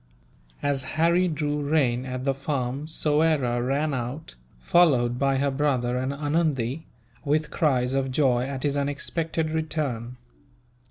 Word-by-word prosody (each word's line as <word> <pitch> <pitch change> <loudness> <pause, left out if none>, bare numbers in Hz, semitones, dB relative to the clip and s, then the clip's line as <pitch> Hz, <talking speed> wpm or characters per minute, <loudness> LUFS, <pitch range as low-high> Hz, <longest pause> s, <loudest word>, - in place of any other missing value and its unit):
As 140 -1 +1 0.2
Harry 170 +3 +3
drew 150 -2 -1
rein 135 -4 +1
at 130 0 -4
the 135 - +2
farm 135 0 -3
Soyera 150 -6 +1
ran 140 +4 0
out, 130 +5 -5 0.3
followed 125 - +3
by 135 0 +2
her 140 +1 +1
brother 130 -3 0
and 130 +2 -1
Anundee, 145 -2 -1 0.4
with 150 +1 0
cries 130 -5 +1
of 135 -1 0
joy 130 -3 +2
at 135 -2 -5
his 145 -1 0
unexpected 155 +3 -2
return. 140 -7 -3
140 Hz, 130 wpm, -25 LUFS, 130-155 Hz, 0.4 s, Harry